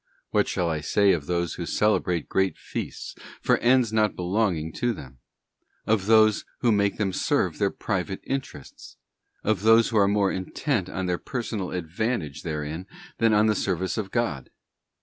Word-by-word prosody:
What -, -, +2 dB
shall 90 Hz, -, -1 dB
I 80 Hz, -2 st, -1 dB
say 100 Hz, +6 st, +3 dB
of 75 Hz, -5 st, -1 dB
those 85 Hz, -1 st, -1 dB
who 85 Hz, -, -5 dB
celebrate 90 Hz, -6 st, +1 dB
great 95 Hz, 0 st, 0 dB
feasts -, -, -6 dB, 0.3 s
for -, -, +2 dB
ends 120 Hz, -2 st, +3 dB
not 110 Hz, -1 st, +2 dB
belonging 90 Hz, -4 st, 0 dB
to 120 Hz, -1 st, +1 dB
them? 65 Hz, -, -11 dB, 0.7 s
of 105 Hz, -3 st, +1 dB
those 110 Hz, -1 st, +5 dB, 0.2 s
who 120 Hz, -, +3 dB
make 100 Hz, -1 st, +1 dB
them 100 Hz, -3 st, -1 dB
serve -, -, 0 dB
their -, -, +3 dB
private -, -, -3 dB
interests? 135 Hz, -, -6 dB, 0.5 s
of 105 Hz, -3 st, +1 dB
those 115 Hz, +1 st, +5 dB
who 110 Hz, -, 0 dB
are 100 Hz, -1 st, +5 dB
more 100 Hz, -1 st, +2 dB
intent 95 Hz, -, -2 dB
on 95 Hz, 0 st, -3 dB
their 90 Hz, -1 st, -1 dB
personal 110 Hz, -7 st, -4 dB
advantage 90 Hz, -, -3 dB
therein 80 Hz, +2 st, -4 dB, 0.3 s
than 115 Hz, -1 st, +4 dB
on 105 Hz, 0 st, +4 dB
the 110 Hz, -, +3 dB
service 95 Hz, -3 st, -1 dB
of 105 Hz, -3 st, -3 dB
God? 110 Hz, -, -2 dB
100 Hz, 170 wpm, -25 LUFS, 85-110 Hz, 0.7 s, those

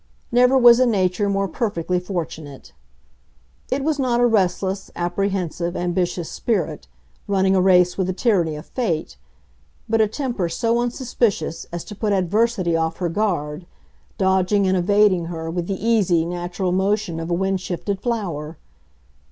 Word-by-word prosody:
Never 250 Hz, +2 st, +5 dB
was 240 Hz, -1 st, +7 dB
a 255 Hz, -, +4 dB
nature 200 Hz, -2 st, +1 dB
more 195 Hz, 0 st, 0 dB
perfectly 180 Hz, -6 st, -1 dB
fortunate. 160 Hz, -6 st, -6 dB, 1.0 s
It 270 Hz, +1 st, -1 dB
was 305 Hz, -1 st, 0 dB
not 245 Hz, -3 st, +1 dB
a 245 Hz, -, +4 dB
restless, 195 Hz, -3 st, 0 dB
apprehensive, 175 Hz, -1 st, -2 dB
ambitious 175 Hz, -1 st, -1 dB
spirit, 180 Hz, -9 st, -2 dB, 0.4 s
running 195 Hz, -1 st, +2 dB
a 185 Hz, -, +3 dB
race 180 Hz, -1 st, +4 dB
with 185 Hz, -, +1 dB
the 185 Hz, -, -1 dB
tyranny 180 Hz, -7 st, +1 dB
of 150 Hz, -, -8 dB
fate, 170 Hz, -, -2 dB, 0.7 s
but 225 Hz, 0 st, +2 dB
a 215 Hz, -, +4 dB
temper 225 Hz, -, -2 dB
so 230 Hz, +7 st, 0 dB
unsuspicious 235 Hz, -, -1 dB
as 170 Hz, -1 st, -5 dB
to -, -, -9 dB
put 210 Hz, 0 st, -1 dB
Adversity 195 Hz, -1 st, +1 dB
off 165 Hz, 0 st, -1 dB
her 175 Hz, -2 st, -1 dB
guard, 170 Hz, -4 st, -2 dB, 0.5 s
dodging 190 Hz, +1 st, +2 dB
and 190 Hz, -, +2 dB
evading 190 Hz, -1 st, +3 dB
her 165 Hz, -1 st, -5 dB
with 175 Hz, 0 st, -3 dB
the 195 Hz, -, -1 dB
easy, 190 Hz, -8 st, +3 dB
natural 175 Hz, +1 st, -3 dB
motion 190 Hz, -2 st, 0 dB
of 165 Hz, +1 st, -5 dB
a 170 Hz, -, +1 dB
wind 190 Hz, +1 st, -1 dB
shifted 190 Hz, +2 st, -4 dB
flower. 170 Hz, -10 st, -3 dB
190 Hz, 150 wpm, -21 LUFS, 175-215 Hz, 1.0 s, was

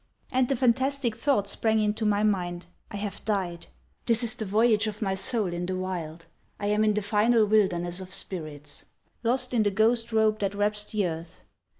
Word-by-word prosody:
And 255 Hz, -1 st, +1 dB
the 275 Hz, -, +2 dB
fantastic 260 Hz, 0 st, +1 dB
thought 230 Hz, -3 st, +1 dB
sprang 220 Hz, +2 st, +1 dB
into 215 Hz, +1 st, 0 dB
my 205 Hz, 0 st, +2 dB
mind: 180 Hz, -4 st, -1 dB, 0.2 s
I -, -, -8 dB
have 200 Hz, -1 st, -5 dB
died. 180 Hz, -5 st, -2 dB, 0.4 s
This 230 Hz, -1 st, +5 dB
is 225 Hz, -2 st, +4 dB
the 225 Hz, -2 st, -5 dB
voyage 220 Hz, +2 st, +3 dB
of 210 Hz, 0 st, -5 dB
my 195 Hz, -3 st, -1 dB
soul 195 Hz, -1 st, +1 dB
in 175 Hz, +1 st, -3 dB
the 185 Hz, -, -2 dB
wild. 170 Hz, -3 st, -5 dB, 0.3 s
I 205 Hz, -, -3 dB
am 210 Hz, +1 st, +2 dB
in 215 Hz, -1 st, +2 dB
the 210 Hz, -, -1 dB
final 215 Hz, +2 st, +3 dB
wilderness 185 Hz, -4 st, +1 dB
of 185 Hz, -1 st, -9 dB
spirits—lost 185 Hz, -, -4 dB
in 235 Hz, -, +3 dB
the 205 Hz, -, +2 dB
ghost 225 Hz, +3 st, +1 dB
robe 220 Hz, -1 st, +2 dB
that 200 Hz, 0 st, -1 dB
wraps 210 Hz, 0 st, 0 dB
the 210 Hz, -3 st, 0 dB
earth. 165 Hz, 0 st, -7 dB
210 Hz, 190 wpm, -27 LUFS, 185-225 Hz, 0.4 s, This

